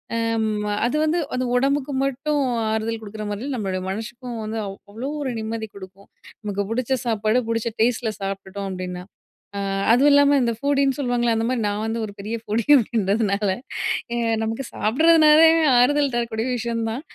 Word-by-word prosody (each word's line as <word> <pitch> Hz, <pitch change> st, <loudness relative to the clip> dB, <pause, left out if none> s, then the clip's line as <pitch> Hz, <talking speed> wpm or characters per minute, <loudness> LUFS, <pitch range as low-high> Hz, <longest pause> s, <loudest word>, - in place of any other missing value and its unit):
அ -, -, 0 dB, 0.3 s
ம், 210 Hz, -1 st, -1 dB, 0.2 s
அது 245 Hz, -, 0 dB
வந்து 315 Hz, +2 st, +1 dB, 0.2 s
அது 255 Hz, -, -1 dB
உடம்புக்கு 275 Hz, +2 st, +1 dB
மட்டும் 280 Hz, +2 st, -1 dB, 0.3 s
ஆறுதல் 220 Hz, +1 st, -2 dB
கொடுக்குற 215 Hz, 0 st, -7 dB
மாதிரி 220 Hz, +7 st, -4 dB
நம்பளோட 195 Hz, -5 st, -2 dB
மனசுக்கும் 235 Hz, +3 st, -6 dB
வந்து 220 Hz, +1 st, -4 dB
அவ் 195 Hz, -1 st, -6 dB
அவ்வளோ 235 Hz, +6 st, -5 dB
ஒரு 265 Hz, -, -2 dB
நிம்மதி 220 Hz, 0 st, -4 dB
கொடுக்கும். 195 Hz, 0 st, -12 dB, 0.3 s
நமக்கு 205 Hz, -2 st, -2 dB
பிடிச்ச 255 Hz, +2 st, -1 dB
சாப்பாடு 220 Hz, 0 st, +1 dB
பிடிச்ச 230 Hz, 0 st, -1 dB
டேஸ்ட்ல 230 Hz, -1 st, +1 dB
சாப்பிட்டுட்டோம் 195 Hz, 0 st, -5 dB
அப்டீன்னா. 180 Hz, -1 st, -5 dB, 0.6 s
அ -, -, -2 dB, 0.3 s
அதுவும் 270 Hz, +5 st, +5 dB
இல்லாம 285 Hz, 0 st, +5 dB
இந்த 235 Hz, -1 st, +1 dB
ஃபூடின்னு 275 Hz, 0 st, +1 dB
சொல்லுவாங்களே! 245 Hz, -3 st, +1 dB
அந்த 225 Hz, -, 0 dB
மாதிரி 250 Hz, -2 st, -1 dB
நான் 205 Hz, +1 st, -2 dB
வந்து 225 Hz, +1 st, -2 dB
ஒரு 205 Hz, -, -9 dB
பெரிய 215 Hz, +3 st, -3 dB
ஃபூடி 225 Hz, +1 st, -1 dB
அப்டீன்றதுனால 210 Hz, -3 st, +1 dB, 0.9 s
நமக்கு 225 Hz, +4 st, -3 dB
சாப்பிடுறதுனாலே 315 Hz, +6 st, +5 dB, 0.3 s
ஆறுதல் 280 Hz, +2 st, +3 dB
தரக்கூடிய 230 Hz, -1 st, -1 dB
விஷயம் 230 Hz, -1 st, -2 dB
தான். 240 Hz, +5 st, -4 dB
230 Hz, 155 wpm, -22 LUFS, 210-260 Hz, 0.9 s, அதுவும்